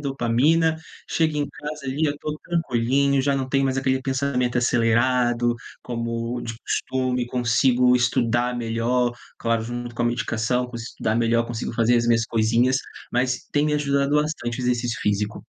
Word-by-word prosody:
dopamina, 140 +5 +2 0.3
chego 160 -2 +1
em 145 -1 -1
casa 150 -1 -7
ali, 135 +4 -1
eu 145 - -1
tô 150 0 -5
tranquilinho, 140 -3 +1
já 140 +1 +1
não 130 -1 -2
tenho 135 +1 +2
mais 130 -1 0
aquele 130 0 +1
pensamento 130 -2 -1
acelerado 120 0 +2 0.3
como 115 0 -3
de 115 - -5
costume, 130 -1 -1
consigo 125 +1 +3
estudar 120 0 +1
melhor, 120 +1 0 0.2
claro, 115 -1 0
junto 120 +1 -5
com 120 - -2
a - - +2
medicação, 120 0 0
consigo 115 -1 -7
estudar 110 - -1
melhor, 115 0 +2
consigo 115 -1 -4
fazer 115 +1 +3
as 120 0 +1
minhas 115 -1 +3
coisinhas, 115 +3 +2 0.4
mas 125 0 0
tem 145 +1 +2
me 150 - +1
ajudado 140 -1 +1
bastante 150 -6 -1
o - - -3
exercício 120 -1 0
físico. 105 0 -1
125 Hz, 160 wpm, -23 LUFS, 115-135 Hz, 0.4 s, consigo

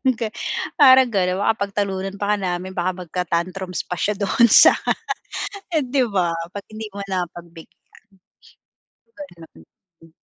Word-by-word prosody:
yung 260 -1 +3
ga 225 -2 -2 0.5
parang 260 -3 +7
gano'n. 185 -1 +1
Baka 220 - +3
pagtalunan 195 -1 -3
pa 205 +1 +1
nga 185 -3 -2
namin, 185 +1 -8
baka 180 +1 -2
magka-tantrums 180 +2 -3
pa 180 - -4
siya 210 - 0
do'n 210 +4 +3
sa - - +8 1.0
eh 305 - +3
'di 255 0 +1
ba? 180 -4 +1 0.2
'Pag 200 - -6
hindi 215 0 -7
mo 200 - -6
napagbigyan. 175 -2 -7 1.3
Ganon. 165 - -16
190 Hz, 135 wpm, -21 LUFS, 175-210 Hz, 1.3 s, sa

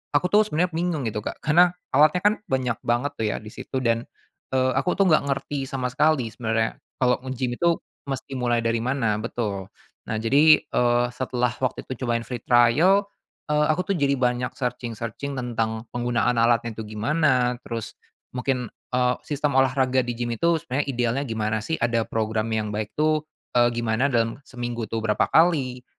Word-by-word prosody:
aku 180 +5 +2
tuh 210 +1 +5
sebenernya 175 0 0
bingung 165 -3 -1
gitu, 110 -2 -2
Kak, 105 - -7
karena 175 +4 +4 0.2
alatnya 155 +6 +4
kan 205 +1 +5
banyak 125 -5 -1
banget 120 +4 0
tuh 110 - +1
ya 105 - -1
di 105 - -10
situ 130 +3 -5
dan, 115 0 0 0.5
eee, 130 0 +3
aku 180 - 0
tuh 195 - +3
nggak 165 -5 +5
ngerti 140 0 -2
sama 130 -2 -3
sekali 140 -4 +2
sebenernya 110 0 -1 0.2
kalau 125 -1 +2
ngegim 130 -1 -3
itu 170 -1 +3 0.3
mesti 135 -1 -4
mulai 120 -1 +1
dari 115 0 +1
mana 115 -3 0
betul. 105 -4 -3 0.4
Nah, 110 - -2
jadi, 140 +8 +5
eee, 120 0 +2
setelah 125 -1 -1
waktu 130 -2 -2
itu 130 -1 -5
cobain 115 0 0
free 125 0 -5
trial, 125 - +4 0.5
eee, 150 0 +3
aku 155 +4 +1
tuh - - +1
jadi 140 -1 +2
banyak 125 -1 -1
searching-searching 120 +2 -4
tentang 115 -3 -2
penggunaan 120 0 0
alatnya 115 0 +2
itu 110 0 -7
gimana, 125 0 +2
terus 115 -3 -6 0.3
mungkin, 125 -2 -2 0.2
eee, 125 0 +2
sistem 145 -2 +1
olahraga 130 0 +2
di 120 - -2
gim 120 0 -3
itu 170 +8 +2
sebenernya 145 -3 -2
idealnya 125 0 0
gimana 110 -1 -1
sih, 135 +10 -2
ada 115 -4 0
program 110 0 -1
yang 105 -1 -2
baik 105 0 -4
tuh, 155 0 +1 0.3
eee, 120 -1 +5
gimana 115 +2 +1
dalam 115 -2 0
seminggu 120 -2 -4
tuh 115 - -2
berapa 105 -1 +1
kali, 140 -7 +2
125 Hz, 175 wpm, -24 LUFS, 115-140 Hz, 0.5 s, tuh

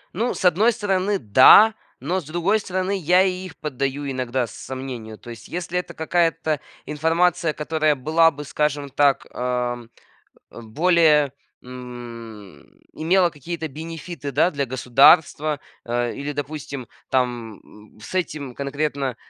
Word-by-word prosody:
Ну, 230 +6 -1
с 190 - -4
одной 195 +7 +4
стороны, 205 -3 0
да, 130 - +7 0.3
но 175 +9 -1
с - - -16
другой 175 +7 0
стороны, 185 0 -2
я 180 +2 +4
и 185 0 -2
их 180 - -11
поддаю 140 -1 -3
иногда 130 -1 -1
сомнению. 120 -1 -8
То 120 - -11
есть, 115 -1 -11
если 180 0 -3
это 180 - -8
какая-то 165 -2 0 0.3
информация, 165 +2 +1
которая 155 0 0
была 160 +5 +3
бы, 150 -1 -8
скажем 145 0 -2
так, 140 0 +2
ам, 125 -1 -3 0.6
в 115 - -11
более, 155 -1 +3 0.3
м, 115 - -10 0.3
имела 175 +3 +2
какие-то 160 +2 -6
бенефиты, 160 0 -7
да, 175 - +3
для 140 -2 -2
государства, 140 +4 +3 0.2
а, 120 0 -1
или, 145 +1 -5
допустим, 140 -3 -6 0.2
там, 120 -4 -1
м, 105 0 -18
с 115 - -10
этим 150 -7 -3
конкретно, 140 -1 -2
145 Hz, 135 wpm, -22 LUFS, 125-170 Hz, 0.6 s, да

